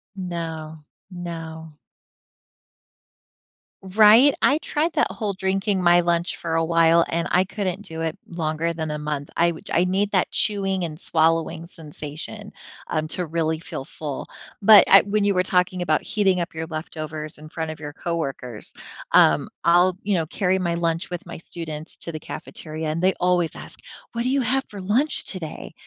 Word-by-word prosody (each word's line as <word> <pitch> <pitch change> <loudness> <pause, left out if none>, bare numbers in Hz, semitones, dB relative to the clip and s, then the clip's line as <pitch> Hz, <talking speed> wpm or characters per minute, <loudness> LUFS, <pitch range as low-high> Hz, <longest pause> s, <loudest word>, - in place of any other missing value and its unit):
No, 160 -4 -5 0.3
no. 160 -3 -7 2.1
Right? 215 +8 +6
I 290 +3 +4
tried 320 +1 -1
that - - +2
whole 210 -3 -3
drinking 190 +1 0
my 175 0 +5
lunch 170 0 0
for 165 -1 -4
a 165 0 +2
while, 165 0 +4
and 170 0 -1
I 185 +1 +4
couldn't 190 -1 -3
do 165 -5 -7
it 160 -1 -2
longer 165 0 -2
than 160 -1 -3
a 150 - -3
month. 150 -1 -4
I 170 - +4
w 165 -2 -3
I 175 +2 +4
need 195 +3 0
that 190 -3 +2
chewing 195 -3 0
and 155 -1 -5
swallowing 165 0 +1
sensation, 160 +5 -8 0.4
um 155 -1 0
to 180 +2 -3
really 160 0 -1
feel 135 - -6
full, 145 -1 -6 0.3
but 210 +1 +9
I 195 - +9
when 205 +1 0
you 200 -1 +3
were 185 - +3
talking 180 0 +1
about 155 -3 +1
heating 195 -3 +1
up 170 +2 -4
your 160 0 -4
leftovers 155 -1 -6
in 155 0 -11
front 160 -1 -4
of 155 - -9
your 145 -1 -6
coworkers, 135 -8 -4 0.4
um, - - +5
I'll, 175 +2 +4
you 205 - 0
know, 165 -4 0
carry 190 +2 0
my 170 -2 0
lunch 170 +1 -1
with 175 -1 -5
my 175 - -8
students 160 -1 -6
to 170 - -2
the 155 - -5
cafeteria, 155 +1 -6
and 155 +2 -2
they 190 +1 +3
always 175 -2 +1
ask, - - -7 0.3
"What 235 - -2
do 250 - 0
you 275 +1 +2
have 265 +3 +2
for 205 - -8
lunch 225 +11 0
today?" 170 -6 -7
170 Hz, 175 wpm, -23 LUFS, 160-190 Hz, 2.1 s, but